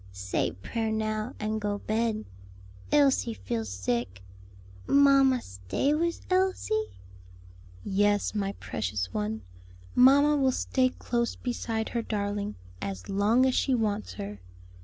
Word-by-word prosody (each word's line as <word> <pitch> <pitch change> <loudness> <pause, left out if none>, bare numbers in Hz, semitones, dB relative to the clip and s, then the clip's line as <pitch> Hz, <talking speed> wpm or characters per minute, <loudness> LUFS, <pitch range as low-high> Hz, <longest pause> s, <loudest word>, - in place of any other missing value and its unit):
"Say 95 -3 -1
prayer 220 - -3
now, 215 0 -2
and 215 0 -2
go 205 0 -1
bed. 220 +1 -1 0.7
Elsie 275 -5 +3
feel 115 - -3
sick. 95 0 -3 0.6
Mamma, 275 -3 +5
stay 95 - -1
wis 335 +2 0
Elsie?" 380 +4 0 0.9
"Yes, 205 +1 +1
my 200 -2 -1
precious 95 - -3
one, 105 0 -2 0.5
mamma 280 +4 +6
will 265 -2 +3
stay 255 0 +1
close 235 -1 -2
beside 225 -3 -3
her 235 - -1
darling 205 - -2 0.3
as 95 -2 -5
long 210 +6 +3
as 260 - +2
she 265 0 +2
wants 205 - -1
her. 100 +1 -6
215 Hz, 120 wpm, -28 LUFS, -, 0.9 s, mamma